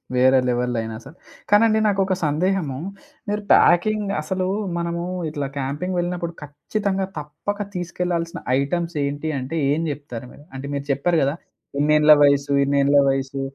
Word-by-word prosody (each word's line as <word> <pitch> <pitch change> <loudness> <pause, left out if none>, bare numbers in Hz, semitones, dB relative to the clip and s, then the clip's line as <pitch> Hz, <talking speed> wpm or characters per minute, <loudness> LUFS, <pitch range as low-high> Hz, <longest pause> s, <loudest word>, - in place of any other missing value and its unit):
వేరే 130 +1 +5
లెవెల్‌ 125 0 0
లైనసలు. 115 +7 -6 0.3
కానండి 220 +1 +5
నాకొక 195 -2 +1
సందేహము. 155 -2 0 0.5
మీరు 210 0 -1
ప్యాకింగ్ 205 +3 +3
అసలు 185 +4 -2 0.3
మనము 170 0 -2 0.3
ఇట్లా 145 -2 -3
క్యాంపింగ్ 145 +7 -3
వెళ్ళినప్పుడు 175 -1 -3
ఖచ్చితంగా 190 +7 -2
తప్పక 180 +8 -4
తీసుకెళ్లాల్సిన 175 -1 -3 0.2
ఐటెమ్స్ 170 +3 -2
ఏంటి 145 +3 -3
అంటే 135 +6 -4
ఏం 155 +3 +1
జెప్తారు 130 -4 -7
మీరు? 145 - -16
అంటే 135 +1 -6
మీరు 140 0 -4
చెప్పారు 160 +4 +1
కదా! 140 +3 0 0.4
ఇన్నేళ్ల 150 +1 +5
వయసు, 140 0 +3
ఇన్నేళ్ల 140 +1 +3
వయస్సు, 135 0 -2
155 Hz, 135 wpm, -22 LUFS, 140-180 Hz, 0.5 s, వేరే